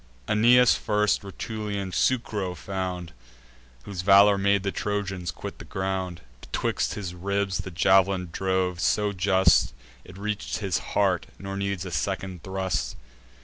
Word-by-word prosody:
Aeneas 120 Hz, +4 st, +6 dB
first 105 Hz, -2 st, +1 dB
Rutulian 100 Hz, -1 st, -4 dB
Sucro 105 Hz, -4 st, 0 dB
found, 90 Hz, -2 st, -4 dB, 0.7 s
Whose 95 Hz, +3 st, -5 dB
valour 100 Hz, +2 st, +7 dB
made 100 Hz, 0 st, +2 dB
the 100 Hz, -, -1 dB
Trojans 95 Hz, -4 st, -3 dB
quit -, -, -7 dB
their -, -, -10 dB
ground; 95 Hz, -2 st, -3 dB, 0.2 s
Betwixt -, -, -2 dB
his 95 Hz, -4 st, -5 dB
ribs 100 Hz, +1 st, -1 dB
the 90 Hz, -, -5 dB
jav'lin 95 Hz, +1 st, +3 dB
drove 95 Hz, -1 st, 0 dB
so 105 Hz, +4 st, +1 dB
just, 95 Hz, 0 st, +3 dB, 0.3 s
It 90 Hz, -, -13 dB
reach'd 105 Hz, +1 st, -3 dB
his 95 Hz, -6 st, -1 dB, 0.2 s
heart, 95 Hz, -2 st, +2 dB
nor 95 Hz, 0 st, -6 dB
needs 100 Hz, -2 st, -2 dB
a 90 Hz, -, -6 dB
second 90 Hz, +4 st, -3 dB
thrust. 95 Hz, -10 st, -2 dB
95 Hz, 135 wpm, -26 LUFS, 90-100 Hz, 0.7 s, valour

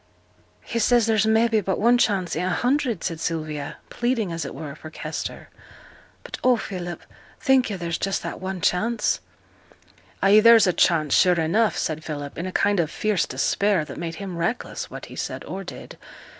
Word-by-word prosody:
'He 235 Hz, -, -3 dB
says 235 Hz, +1 st, +4 dB
there's 220 Hz, -1 st, +2 dB
mebbe 220 Hz, -1 st, +3 dB
but 190 Hz, 0 st, -1 dB
one 240 Hz, +3 st, +4 dB
chance 195 Hz, -7 st, +1 dB
i' -, -, -1 dB
a 180 Hz, +1 st, 0 dB
hundred,' 245 Hz, -, 0 dB
said 165 Hz, -3 st, -3 dB
Sylvia, 155 Hz, -3 st, -3 dB
pleading, 240 Hz, -6 st, -1 dB
as 165 Hz, 0 st, -3 dB
it -, -, -7 dB
were, 150 Hz, -3 st, -6 dB
for 155 Hz, +1 st, -10 dB
Kester; -, -, -6 dB, 0.7 s
'but -, -, -8 dB
oh! 250 Hz, -1 st, +5 dB
Philip, 180 Hz, -4 st, -6 dB, 0.4 s
think 265 Hz, -3 st, +3 dB
yo' 200 Hz, -, -3 dB
there's 170 Hz, -2 st, -3 dB
just 195 Hz, 0 st, -1 dB
that -, -, -6 dB
one 190 Hz, -1 st, -4 dB
chance?' 220 Hz, +8 st, +1 dB, 1.0 s
'Ay, 200 Hz, +2 st, +7 dB
there's 230 Hz, 0 st, +7 dB
a 180 Hz, -, +2 dB
chance, 155 Hz, -5 st, +2 dB
sure 180 Hz, -2 st, +4 dB
enough,' 210 Hz, +8 st, +2 dB
said 155 Hz, 0 st, -2 dB
Philip, 145 Hz, -2 st, -6 dB
in 175 Hz, -, -3 dB
a -, -, -4 dB
kind 205 Hz, +1 st, +2 dB
of 160 Hz, -3 st, +1 dB
fierce 210 Hz, -6 st, 0 dB
despair 180 Hz, +6 st, +1 dB
that -, -, -8 dB
made 165 Hz, -1 st, -4 dB
him 190 Hz, -2 st, -6 dB
reckless 175 Hz, +9 st, -3 dB
what -, -, -8 dB
he -, -, -11 dB
said -, -, -4 dB
or -, -, -6 dB
did. -, -, -10 dB
190 Hz, 185 wpm, -24 LUFS, 165-225 Hz, 1.0 s, Ay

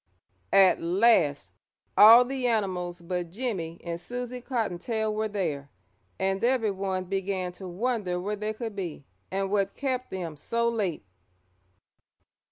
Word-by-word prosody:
At 190 Hz, -2 st, +6 dB
last 170 Hz, -, +3 dB, 0.4 s
all 230 Hz, +4 st, +9 dB
the 260 Hz, -1 st, -2 dB
animals 185 Hz, -6 st, -1 dB
but 175 Hz, -1 st, -3 dB
Jimmie 180 Hz, -6 st, -4 dB
and 170 Hz, 0 st, -4 dB
Susie 245 Hz, +2 st, -5 dB
Cottontail 220 Hz, -2 st, -2 dB
were 215 Hz, +1 st, -1 dB
there, 160 Hz, -9 st, -3 dB, 0.5 s
and 195 Hz, +1 st, -1 dB
everyone 200 Hz, -7 st, 0 dB
began 190 Hz, -1 st, -2 dB
to 185 Hz, +1 st, -9 dB
wonder 190 Hz, -1 st, -1 dB
where 205 Hz, +4 st, -2 dB
they 215 Hz, +1 st, -3 dB
could 225 Hz, -1 st, -6 dB
be 170 Hz, -7 st, -5 dB, 0.2 s
and 195 Hz, 0 st, -2 dB
what 200 Hz, -1 st, 0 dB
kept 255 Hz, -2 st, -2 dB
them 170 Hz, -5 st, -5 dB
so 235 Hz, +9 st, -1 dB
late. 200 Hz, -, -2 dB
195 Hz, 130 wpm, -27 LUFS, 180-230 Hz, 0.5 s, all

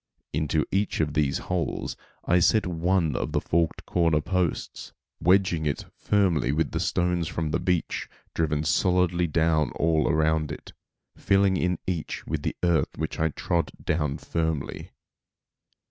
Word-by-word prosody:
Into 75 Hz, 0 st, +1 dB
each 100 Hz, +1 st, 0 dB
of 75 Hz, -2 st, 0 dB
these 75 Hz, -3 st, +1 dB
holes 90 Hz, -2 st, -3 dB, 0.3 s
I 90 Hz, +1 st, +4 dB
set 110 Hz, +5 st, +3 dB
one 85 Hz, -3 st, +1 dB
of -, -, -2 dB
the -, -, +2 dB
forked 85 Hz, -1 st, 0 dB
corner 85 Hz, -3 st, +2 dB
posts, 90 Hz, +1 st, -2 dB, 0.3 s
wedging 90 Hz, -3 st, +3 dB
it 70 Hz, -, -2 dB
firmly 90 Hz, -10 st, +1 dB
with 80 Hz, +3 st, 0 dB
stones 90 Hz, -2 st, 0 dB
from 80 Hz, -1 st, -2 dB
the -, -, +1 dB
beach, 90 Hz, -3 st, -1 dB, 0.2 s
driven 75 Hz, -2 st, 0 dB
solidly 90 Hz, +1 st, +2 dB
down 80 Hz, -1 st, +2 dB
all 80 Hz, -2 st, +2 dB
around 80 Hz, -1 st, +1 dB
it, 75 Hz, -, -9 dB, 0.4 s
filling 100 Hz, -1 st, +3 dB
in 90 Hz, -1 st, 0 dB
each 85 Hz, -4 st, -3 dB
with -, -, -2 dB
earth 85 Hz, -2 st, +1 dB
which 80 Hz, 0 st, -3 dB
I 80 Hz, 0 st, +2 dB
trod 85 Hz, +3 st, -1 dB
down 75 Hz, -3 st, 0 dB
firmly. 80 Hz, -3 st, -3 dB
80 Hz, 140 wpm, -26 LUFS, 75-90 Hz, 0.4 s, I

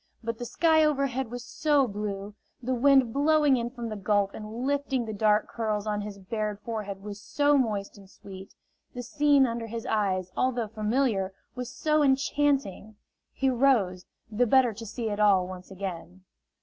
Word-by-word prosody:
But 230 Hz, 0 st, -4 dB
the 240 Hz, -, -4 dB
sky 315 Hz, +4 st, +3 dB
overhead 270 Hz, -4 st, 0 dB
was 245 Hz, +1 st, -7 dB
so 290 Hz, -3 st, +2 dB
blue, 205 Hz, -1 st, -5 dB, 0.3 s
the 255 Hz, +1 st, -2 dB
wind 260 Hz, -2 st, +4 dB
blowing 295 Hz, -1 st, +3 dB
in 235 Hz, 0 st, -2 dB
from 240 Hz, -2 st, -6 dB
the 215 Hz, -, -4 dB
Gulf 205 Hz, 0 st, +1 dB
and 220 Hz, +3 st, -6 dB
lifting 275 Hz, -3 st, 0 dB
the 220 Hz, -, -5 dB
dark 210 Hz, 0 st, +2 dB
curls 215 Hz, -3 st, -2 dB
on 210 Hz, -1 st, -1 dB
his 205 Hz, -1 st, -7 dB
bared 210 Hz, +1 st, -4 dB
forehead 205 Hz, -4 st, -5 dB
was 205 Hz, 0 st, -8 dB
so 290 Hz, +4 st, +2 dB
moist 210 Hz, -6 st, -1 dB
and 195 Hz, -1 st, -16 dB
sweet, 190 Hz, 0 st, -12 dB, 0.4 s
the 245 Hz, -, -5 dB
scene 285 Hz, +1 st, +3 dB
under 230 Hz, -1 st, -3 dB
his 230 Hz, 0 st, -6 dB
eyes, 185 Hz, -4 st, -1 dB
although 245 Hz, -3 st, 0 dB
familiar, 215 Hz, -3 st, 0 dB, 0.2 s
was 250 Hz, -1 st, -6 dB
so 305 Hz, +2 st, +1 dB
enchanting! 275 Hz, -6 st, +1 dB, 0.4 s
He 270 Hz, -1 st, 0 dB
rose, 235 Hz, -9 st, +2 dB, 0.2 s
the 240 Hz, +3 st, +2 dB
better 250 Hz, -1 st, +4 dB
to 225 Hz, +2 st, -9 dB
see 230 Hz, +2 st, -4 dB
it 205 Hz, -, -3 dB
all 195 Hz, -3 st, +4 dB
once 185 Hz, -1 st, -9 dB
again. 185 Hz, -1 st, -7 dB
225 Hz, 175 wpm, -27 LUFS, 205-265 Hz, 0.4 s, wind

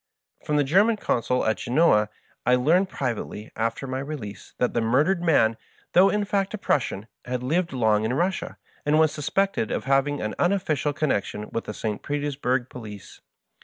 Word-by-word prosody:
From 150 Hz, -, -1 dB
the 145 Hz, -, +4 dB
Genuan 200 Hz, +10 st, +3 dB
Consul 125 Hz, -, 0 dB
at 110 Hz, -, +1 dB
Genoa 120 Hz, -6 st, +3 dB, 0.3 s
I 125 Hz, -, +4 dB
learned 170 Hz, +10 st, +3 dB
privately, 115 Hz, -, -4 dB
after 115 Hz, +4 st, -2 dB
my 130 Hz, 0 st, -3 dB
release, 130 Hz, -9 st, -7 dB
that 125 Hz, -, 0 dB
the 115 Hz, -, +1 dB
murdered 145 Hz, +11 st, +2 dB
man, 115 Hz, -10 st, +3 dB, 0.4 s
though 190 Hz, +3 st, +6 dB
in 210 Hz, -1 st, 0 dB
fact 195 Hz, +1 st, -1 dB
a -, -, -5 dB
Prussian, 120 Hz, -, -1 dB, 0.2 s
had 125 Hz, 0 st, -3 dB
lived 170 Hz, +6 st, 0 dB
long 110 Hz, -4 st, +2 dB
in 115 Hz, +3 st, 0 dB
Russia, 180 Hz, +3 st, -1 dB, 0.3 s
and 150 Hz, +1 st, +2 dB
was 155 Hz, -1 st, +4 dB
suspected 155 Hz, -, 0 dB
of -, -, -2 dB
having 135 Hz, +2 st, +2 dB
had 110 Hz, -, -2 dB
an -, -, -8 dB
unofficial 170 Hz, -6 st, +1 dB
connection 105 Hz, -7 st, -2 dB
with 115 Hz, -, -3 dB
the 105 Hz, -, -5 dB
St. 105 Hz, -2 st, -3 dB
Petersburg 140 Hz, -4 st, -1 dB
police. 105 Hz, -6 st, -10 dB
135 Hz, 175 wpm, -25 LUFS, 115-170 Hz, 0.4 s, though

